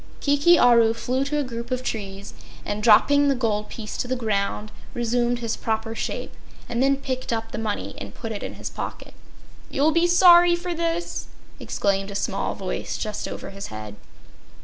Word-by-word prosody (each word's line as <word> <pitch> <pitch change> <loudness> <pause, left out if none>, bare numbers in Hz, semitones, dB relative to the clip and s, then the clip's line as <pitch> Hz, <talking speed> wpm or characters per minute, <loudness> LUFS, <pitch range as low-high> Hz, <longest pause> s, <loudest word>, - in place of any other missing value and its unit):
Kiki 290 +4 +4
Aru 235 -3 +5
flew 255 +3 -1
to 295 +2 -1
a 295 - +1
group 235 -2 -6
of 255 0 -2
trees 200 -4 -5 0.3
and, 205 +1 -3
dropping 285 +7 +5
the 275 - +3
gold 215 -4 -1
piece 215 -2 -7
to - - -2
the 255 - 0
ground, 215 -2 -1 0.2
resumed 240 +1 +1
his 230 -2 -2
proper 225 0 -2
shape, 225 - -4 0.3
and 240 +1 -1
then 275 +1 +3
picked 260 -2 -4
up 225 -1 -2
the - - -4
money 215 -2 -3
and - - -8
put 225 -2 -6
it 205 - -4
in - - -6
his - - -6
pocket. - - -6 0.6
"You'll 290 +3 +2
be 335 +2 +3
sorry 350 -1 +7
for 350 0 -4
this!" 335 +1 -2 0.3
exclaimed 195 0 -1
a 200 - -7
small 200 - -1
voice - - -4
just 215 -1 -4
over - - -7
his 195 0 -7
head. 110 -1 -8
235 Hz, 185 wpm, -24 LUFS, 210-280 Hz, 0.6 s, sorry